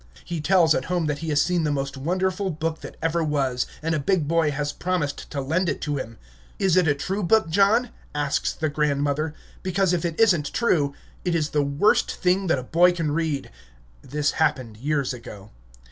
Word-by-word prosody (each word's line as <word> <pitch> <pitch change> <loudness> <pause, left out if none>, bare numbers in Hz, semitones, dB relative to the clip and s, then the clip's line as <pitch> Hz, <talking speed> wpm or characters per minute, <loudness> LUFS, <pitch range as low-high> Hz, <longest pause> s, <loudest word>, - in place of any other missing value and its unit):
He 170 -3 -4
tells 170 -1 +4
at 130 - -1
home 175 -2 0
that 150 -1 -1
he 165 - -4
has 145 -1 +3
seen 175 -2 0
the 150 - +1
most 140 -1 -2
wonderful 185 +7 -1
book 160 -1 -3
that - - -9
ever 165 +1 +1
was, 135 -5 0 0.2
and 165 +1 0
a 155 - +1
big 160 +1 +1
boy 165 -1 +2
has 145 0 -2
promised 175 -6 -2
to 145 - -4
lend 165 +7 0
it 145 - -2
to 145 -1 -2
him. 115 -4 -6 0.4
"Is 190 -4 +2
it 180 -3 +4
a 145 - +3
true 190 +8 -3
book, 190 -2 +2
John?" 210 +6 +3 0.2
asks 145 -1 0
the 160 - -2
grandmother; 145 +1 0 0.3
"because, 185 0 +1
if 175 - 0
it 170 -2 -3
is 225 -5 +6
n't 150 -3 -4
true, 150 -12 +1 0.3
it 175 -2 0
is 155 -2 0
the 150 - +2
worst 140 +8 +2
thing 185 +1 +1
that 165 - +2
a 130 - -4
boy 175 +6 +4
can 165 -4 -1
read." 155 -3 -2 0.5
(This 145 +2 -1
happened 130 -8 0
years 140 +1 -1
ago.) 105 -4 -10
155 Hz, 205 wpm, -24 LUFS, 145-180 Hz, 0.5 s, is